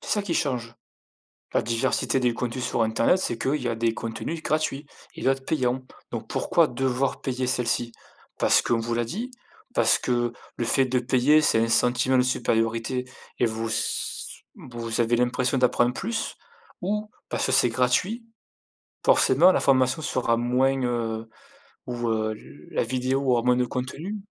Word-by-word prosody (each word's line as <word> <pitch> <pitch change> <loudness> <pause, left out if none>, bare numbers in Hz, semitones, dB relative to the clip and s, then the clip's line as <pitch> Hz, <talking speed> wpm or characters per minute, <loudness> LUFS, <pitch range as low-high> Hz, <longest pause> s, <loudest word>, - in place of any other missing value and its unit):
C'est - - -8
ça 210 - +1
qui 180 -4 -2
change, 120 -5 -2 0.8
la - - +2
diversité 120 +2 0
des 125 -1 +2
contenus 125 +1 -3
sur 120 - 0
internet, 115 +10 +2
c'est 120 -10 -1
qu'il 145 +5 0
y 120 - -1
a 115 - 0
des 115 0 0
contenus 115 +9 -5
gratuits 155 -2 -1 0.3
et - - -9
d'autres 135 0 +1
payant, 130 -3 -1 0.3
donc - - -6
pourquoi - - +2
devoir 130 0 -1
payer 130 -1 -2
celle-ci? 120 -1 0 0.5
Parce - - +4
qu'on 115 - +1
vous 115 +1 -2
l'a 120 0 0
dit? 220 - -5 0.4
Parce - - +4
que, 120 -1 0 0.2
le 120 - -2
fait 130 +3 +3
de 125 0 +1
payer 130 +5 +4
c'est 145 - +3
un 115 - +1
sentiment 125 +3 +3
de 125 - +5
supériorité 115 0 0 0.3
et 120 - +3
vous 115 0 -3
s 110 - -1 0.5
vous 115 -2 -5
avez 120 +1 +2
l'impression 125 +2 +1
d'apprendre 125 -1 +3
plus? 225 - -3 0.4
Ou 210 +3 -2 0.2
parce - - -1
que - - -1
c'est - - +5
gratuit, 130 - 0 0.8
forcément 165 +8 +5
la - - +1
formation 130 +2 +2
sera 125 -5 0
moins, 130 +3 +1
heu 115 -2 -2 0.6
ou, 120 -1 -2
heu, 110 -1 0
l 70 +3 -15
la - - 0
vidéo 130 +3 -1
aura 120 - +3
moins 125 0 +4
de 125 0 +1
contenu? 140 +12 -5
125 Hz, 170 wpm, -25 LUFS, 115-135 Hz, 0.8 s, de